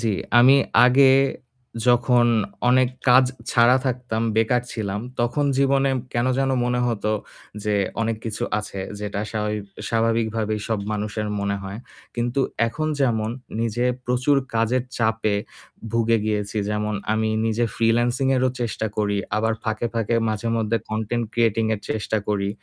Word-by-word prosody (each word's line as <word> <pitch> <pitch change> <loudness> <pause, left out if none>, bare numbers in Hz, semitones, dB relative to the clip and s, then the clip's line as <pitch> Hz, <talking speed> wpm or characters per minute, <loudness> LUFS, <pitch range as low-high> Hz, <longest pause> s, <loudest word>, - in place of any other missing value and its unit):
জ্বি, 110 -3 0 0.2
আমি 130 +3 +7 0.3
আগে 130 +2 +6 0.8
যখন 120 0 +4 0.4
অনেক 130 0 +4 0.2
কাজ 130 +1 +7 0.3
ছাড়া 120 +2 +5
থাকতাম, 125 -3 -2
বেকার 120 +2 +2
ছিলাম 105 -2 -3 0.2
তখন 130 +5 0
জীবনে 135 0 +3 0.2
কেন 120 +1 0
যেন 135 0 +1
মনে 125 0 0
হতো 110 -2 -1 0.5
যে 105 -1 +1 0.3
অনেক 115 0 0
কিছু 110 -1 -4 0.2
আছে 105 -2 -6 0.2
যেটা 105 -1 -3
স্বাভাবি 105 -1 -2 0.3
স্বাভাবিকভাবেই 115 -2 0
সব 110 -2 0
মানুষের 105 0 -3
মনে 100 0 -1
হয়। 95 +3 -6 0.4
কিন্তু 120 +3 -1 0.3
এখন 155 +6 -3
যেমন 115 -4 +1 0.3
নিজে 115 +2 -1 0.2
প্রচুর 125 +3 +2 0.2
কাজের 115 +3 +1 0.2
চাপে 110 -2 +1 0.6
ভুগে 115 0 +2
গিয়েছি। 105 -1 -2
যেমন 105 0 -1 0.2
আমি 110 0 +1 0.2
নিজে 115 +1 +1
ফ্রিল্যান্সিং 120 +3 +2
এরও 130 0 +2
চেষ্টা 110 -2 -2
করি। 105 -1 0 0.2
আবার 110 +1 +1
ফাঁকে, 110 +1 -1
ফাঁকে 115 0 0
মাঝেমধ্যে 115 +1 0
কনটেন্ট 110 +2 -1
ক্রিয়েটিং 115 -1 +2
এর 100 - -8
চেষ্টা 110 0 -1
করি। 100 -1 0
115 Hz, 140 wpm, -23 LUFS, 110-120 Hz, 0.8 s, আমি